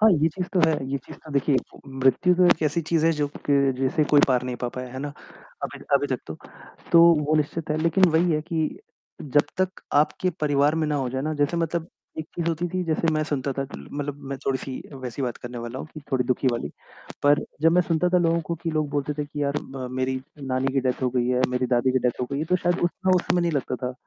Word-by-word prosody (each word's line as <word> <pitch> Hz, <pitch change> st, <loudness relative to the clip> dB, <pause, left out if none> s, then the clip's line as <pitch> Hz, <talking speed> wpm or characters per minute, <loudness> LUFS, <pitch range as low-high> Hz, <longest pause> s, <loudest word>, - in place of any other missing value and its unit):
हाँ, 220 Hz, +1 st, +7 dB
ये 160 Hz, -1 st, +3 dB
चीज़ 180 Hz, +3 st, -4 dB
तो 180 Hz, -, +4 dB
है, -, -, +3 dB, 0.2 s
ये 140 Hz, -, 0 dB
चीज़ -, -, -11 dB
तो 155 Hz, -, -11 dB
देखिए 140 Hz, 0 st, +2 dB, 0.3 s
मृत्यु 135 Hz, +7 st, +3 dB
तो 180 Hz, +1 st, +4 dB
एक 160 Hz, -, +4 dB
एसी 155 Hz, +2 st, +1 dB
चीज़ 165 Hz, -2 st, +2 dB
है 165 Hz, -, +4 dB
जो 145 Hz, -, +2 dB, 0.2 s
क 140 Hz, -1 st, +4 dB
जिसे 135 Hz, +4 st, +1 dB
कोई 145 Hz, -, +7 dB
पार 125 Hz, -2 st, +3 dB
नहीं 125 Hz, -1 st, -4 dB
पा 125 Hz, -, -3 dB
पाया 125 Hz, +1 st, -6 dB
है 130 Hz, -, -6 dB
ना 145 Hz, +1 st, -4 dB, 0.5 s
अभी -, -, -4 dB, 0.2 s
अभी -, -, +3 dB
तक -, -, -4 dB, 0.6 s
तो 170 Hz, -, +8 dB, 0.3 s
वो 155 Hz, -, +2 dB
निश्चित 155 Hz, +1 st, -2 dB
है 155 Hz, -, +1 dB
लेकिन 170 Hz, +3 st, +4 dB
वही 165 Hz, +2 st, +3 dB
है 155 Hz, -, +1 dB
कि 160 Hz, -1 st, -1 dB, 0.5 s
जब 145 Hz, +1 st, +2 dB
तक 185 Hz, 0 st, -1 dB
आपके 155 Hz, +5 st, +2 dB
परिवार 145 Hz, 0 st, +3 dB
में 160 Hz, -1 st, 0 dB
ना 150 Hz, -, 0 dB
हो 135 Hz, -3 st, -1 dB
जाए 130 Hz, +1 st, -2 dB
ना 155 Hz, +1 st, -1 dB
जैसे 145 Hz, +4 st, +2 dB
मतलब 165 Hz, 0 st, -1 dB, 0.3 s
एक 155 Hz, -, -4 dB
चीज़ 170 Hz, -1 st, -1 dB
होती 170 Hz, +2 st, -1 dB
थी 185 Hz, +1 st, -2 dB
जैसे 165 Hz, 0 st, 0 dB
मैं 155 Hz, 0 st, +1 dB
सुनता 140 Hz, -2 st, -2 dB
था 135 Hz, +1 st, -2 dB
कि 130 Hz, -, -9 dB
ल -, -, -14 dB
मतलब 145 Hz, 0 st, -4 dB
मैं 135 Hz, -, -3 dB
थोड़ी-सी 130 Hz, -1 st, -2 dB, 0.2 s
वैसी 125 Hz, +2 st, -4 dB
बात 125 Hz, -2 st, -2 dB
करने 120 Hz, 0 st, -7 dB
वाला 120 Hz, +2 st, -6 dB
हूँ -, -, -6 dB
कि, 155 Hz, -, -7 dB
थोड़ी 130 Hz, -1 st, +2 dB
दु:खी 125 Hz, +1 st, +1 dB
वाली 115 Hz, -11 st, -3 dB, 0.5 s
पर 145 Hz, 0 st, +4 dB, 0.2 s
जब 165 Hz, +1 st, +5 dB
मैं 180 Hz, +1 st, +5 dB
सुनता 170 Hz, +1 st, +1 dB
था 180 Hz, 0 st, +3 dB
लोगों 170 Hz, -1 st, +2 dB
को 170 Hz, +1 st, -4 dB
कि 165 Hz, -, -1 dB
लोग 155 Hz, -1 st, 0 dB
बोलते 145 Hz, 0 st, -1 dB
थे 150 Hz, -, 0 dB
कि 145 Hz, 0 st, -5 dB
यार 140 Hz, 0 st, 0 dB
ब 130 Hz, -2 st, -5 dB
मेरी 130 Hz, 0 st, -1 dB, 0.2 s
नानी 130 Hz, 0 st, -1 dB
की 135 Hz, -, +2 dB
डेथ 130 Hz, 0 st, -1 dB
हो 130 Hz, -, +3 dB
गई 120 Hz, -1 st, +2 dB
है, 125 Hz, 0 st, +2 dB
मेरी 125 Hz, 0 st, 0 dB
दादी 125 Hz, +1 st, +2 dB
की 130 Hz, -, +3 dB
डेथ 125 Hz, -1 st, -1 dB
हो 125 Hz, -, -1 dB
गई 140 Hz, -, -1 dB
है 155 Hz, -, -1 dB
तो 180 Hz, +3 st, +2 dB
शायद 175 Hz, 0 st, 0 dB
उतना 185 Hz, +2 st, 0 dB
उस 180 Hz, -, +1 dB
समय 180 Hz, 0 st, +4 dB
नहीं 170 Hz, -1 st, 0 dB
लगता 135 Hz, -3 st, -1 dB
था 125 Hz, -, -3 dB
145 Hz, 260 wpm, -25 LUFS, 130-165 Hz, 0.6 s, तो